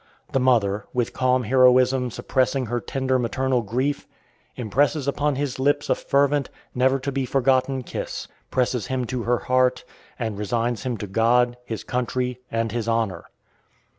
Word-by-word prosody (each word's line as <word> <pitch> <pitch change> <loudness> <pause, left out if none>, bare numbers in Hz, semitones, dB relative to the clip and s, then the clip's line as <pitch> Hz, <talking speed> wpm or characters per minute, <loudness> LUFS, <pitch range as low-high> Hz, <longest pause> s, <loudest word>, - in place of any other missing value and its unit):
The 135 - +2
mother, 110 -6 +2
with 120 -2 0
calm 130 0 +2
heroism 125 +1 +4
suppressing 130 +3 0
her 120 +1 -2
tender 130 +3 0
maternal 125 +2 0
grief, 130 +7 -2 0.5
impresses 140 +5 0
upon 145 0 0
his 135 -1 -3
lips 145 +2 +1
a - - +7
fervent, 140 0 +1 0.2
never 130 +2 +3
to 135 +1 -4
be 135 0 -1
forgotten 130 0 +1
kiss, - - -5 0.2
presses 125 -4 0
him 130 -1 -1
to 125 +1 -3
her 120 +1 +1
heart, 130 0 +1 0.3
and 110 -4 -3
resigns 115 +2 -1
him 125 -3 -3
to 105 - -5
God, 120 +4 +2
his 110 -3 -5
country, 125 0 -2
and 115 0 -1
his 115 -1 -3
honor. 110 -7 -1
125 Hz, 155 wpm, -23 LUFS, 115-130 Hz, 0.5 s, a